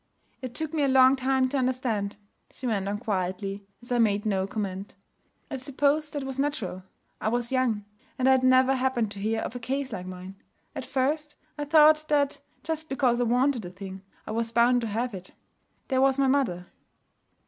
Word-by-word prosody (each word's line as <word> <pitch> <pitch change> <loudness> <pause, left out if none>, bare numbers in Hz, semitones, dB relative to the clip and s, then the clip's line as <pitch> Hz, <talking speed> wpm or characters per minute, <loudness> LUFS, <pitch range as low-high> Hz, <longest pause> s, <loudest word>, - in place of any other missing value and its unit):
'It 255 -2 -6
took 315 +2 -3
me 310 - 0
a 280 - +3
long 260 0 +6
time 265 0 +1
to 270 - -4
understand,' 245 -6 -1 0.3
she 255 - -10
went 205 -5 0
on 205 - -1
quietly, 195 -1 -3 0.2
as 240 - -12
I 245 - +2
made 210 -2 +2
no 195 -2 0
comment. 195 -2 -5 0.6
'I 270 - -2
suppose 285 +3 +1
that 290 -2 -4
was 270 0 -5
natural. 275 -10 -2 0.4
I - - -1
was 240 +1 -1
young; 240 -6 +1 0.3
and 255 - +1
I - - +7
had 260 -1 +4
never 255 +1 +5
happened 255 -5 0
to 200 - -6
hear 220 +2 -1
of - - -5
a - - -4
case 265 +1 -3
like 180 -3 -5
mine. 185 +1 -9 0.3
At - - -5
first, 295 +3 -1 0.2
I 295 - -4
thought 305 0 +6
that, 285 -2 +1 0.2
just 320 -1 -4
because 250 -3 +2
I - - +2
wanted 250 +1 +2
a 175 - -6
thing, 190 +1 -9 0.2
I - - -6
was 230 +1 -1
bound 240 +1 +4
to 230 - -2
have 230 +3 -2
it. 185 -1 -9 0.6
There 260 -1 +2
was 270 0 +4
my 275 - +3
mother.' 255 -11 +1
250 Hz, 200 wpm, -27 LUFS, 205-270 Hz, 0.6 s, I